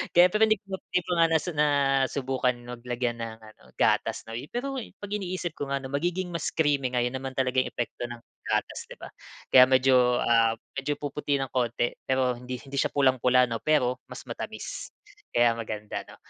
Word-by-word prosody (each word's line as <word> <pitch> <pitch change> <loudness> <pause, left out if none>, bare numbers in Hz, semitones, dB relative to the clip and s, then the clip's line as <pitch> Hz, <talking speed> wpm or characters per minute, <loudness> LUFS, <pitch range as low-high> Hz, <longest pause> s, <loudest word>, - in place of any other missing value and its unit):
Kaya 175 +1 +8
pero 215 - 0
hindi 215 - +4
ko - - -60
nga 190 - -2
'di 180 - +3
ko - - -6
nga 165 - +6
nas 160 0 +1
nasubukan 135 -3 +1
mag 120 0 -8
lagyan 120 -1 -1
ng 115 -1 -5
ano 110 0 -16
gatas - - +1
'no, 115 - -10
eh. 120 +6 -5
Pero 265 +2 -3
'pag 205 -3 -10
iniisip 185 -4 -3
ko 145 - -5
nga 140 - 0
'no, 130 - -7
magiging 175 +5 -1
mas 170 -2 -2
creamy 140 -5 +1
nga, 120 - +2
'yon 125 - -1
naman 130 0 -5
talagang 130 0 +1
epekto 120 0 -4
ng 120 -1 -9 0.3
gatas, - - -1
'di - - -10
ba? - - -10 0.4
Kaya 130 0 +9
medyo, 130 -2 +4
ah, 115 -1 +4 0.2
medyo 140 +1 -2
puputi 145 0 -2
ng 135 -2 -2
konti, 120 -1 0 0.2
pero 130 -1 +2
hindi 125 +1 -6
hindi 140 0 -7
siya - - +2
pulang-pula 130 -2 +4
'no, 115 -2 -4
pero 130 -5 +2
mas - - -9
matamis. - - -6 0.5
Kaya 120 0 +5
maganda 110 -2 -5
'no? - - -13
130 Hz, 200 wpm, -27 LUFS, 120-150 Hz, 0.5 s, Kaya